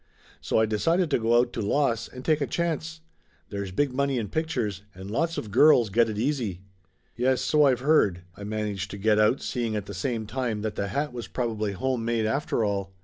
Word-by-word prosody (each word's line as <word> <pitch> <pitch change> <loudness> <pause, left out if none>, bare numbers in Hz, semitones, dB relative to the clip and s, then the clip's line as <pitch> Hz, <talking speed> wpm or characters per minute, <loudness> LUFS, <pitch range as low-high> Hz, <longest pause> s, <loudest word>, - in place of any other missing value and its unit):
So - - 0
I 110 - +4
decided 165 - +1
to - - +3
go 115 +1 +3
out 120 0 +2
to 115 - -3
Los 115 +1 +1
and 125 0 -11
take 155 -2 +2
a 140 - 0
chance. 160 -1 -2 0.5
There's 100 -1 -4
big 130 +8 0
money 140 0 0
in 110 -4 -3
pictures, 125 - -2
and 95 +2 -8
lots 165 +8 0
of 105 - -5
girls 120 -3 +5
get 115 +2 +3
it 105 - -4
easy 115 -7 -1 0.3
!" - - -42
"Yes, 130 +1 +1
so 150 +2 +4
I've 130 -3 +2
heard 105 - +3
!" 90 - -31
I 100 - -9
managed 105 -2 -3
to 100 - -7
get 105 +1 +2
out, 105 +5 +3
seeing 115 -3 -2
at 105 -2 -3
the 100 - -8
same 110 +4 -2
time 115 -2 -2
that 110 - -2
the 100 - -2
hat 140 +5 -2
was 120 -2 -6
probably 110 -4 -2
home 125 +4 -1
made 115 -1 0
after 115 0 0
all. 100 -2 -2
115 Hz, 225 wpm, -26 LUFS, 105-135 Hz, 0.5 s, girls